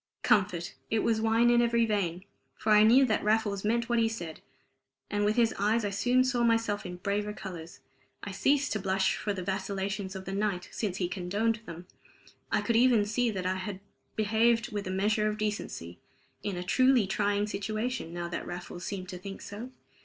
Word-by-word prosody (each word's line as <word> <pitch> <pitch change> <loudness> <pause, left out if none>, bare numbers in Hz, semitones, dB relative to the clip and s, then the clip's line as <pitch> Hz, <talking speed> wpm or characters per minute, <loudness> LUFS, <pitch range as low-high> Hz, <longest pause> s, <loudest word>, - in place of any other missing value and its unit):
Comfort! 180 -4 +2 0.2
It 220 -1 +1
was 220 -1 +1
wine 225 +2 +4
in 240 0 +5
every 235 -1 +3
vein, 190 -4 -1 0.3
for 215 - -1
I 210 0 +7
knew 240 +5 +7
that 220 -4 0
Raffles 210 -2 +1
meant 235 +2 +1
what 240 -1 +2
he 225 -1 +3
said, 170 -8 -6 0.7
and 205 0 0
with 210 +1 +2
his 230 -2 +3
eyes 215 +2 +2
I 205 - -1
soon 245 +6 +3
saw 255 -2 0
myself 225 -4 +1
in 180 - -6
braver 205 +3 -2
colors. 175 -5 -8 0.4
I 200 - -5
ceased 280 +8 +2
to 215 - -1
blush 190 0 +1
for 210 - -2
the 190 -2 -4
vacillations 195 +1 -3
of 190 0 -7
the - - -5
night, 195 -3 -1
since 195 -5 -3
he 180 - 0
condoned 200 +5 -1
them. 170 +1 -8 0.7
I - - +2
could 235 -1 +1
even 235 -3 +5
see 235 +3 +1
that 190 -4 -3
I 185 0 0
had 185 0 -5 0.4
behaved 225 +2 +2
with 205 -2 -3
a - - -3
measure 210 +3 +1
of 210 0 -2
decency, 205 - -4 0.4
in 200 -3 -3
a 180 - -3
truly 255 +4 +4
trying 205 +1 +1
situation, 215 0 -3
now 175 0 -4
that 170 - -5
Raffles 175 0 -7
seemed 185 -2 -5
to 180 -3 -6
think 195 +1 -7
so. 215 +5 -7
205 Hz, 200 wpm, -29 LUFS, 190-225 Hz, 0.7 s, I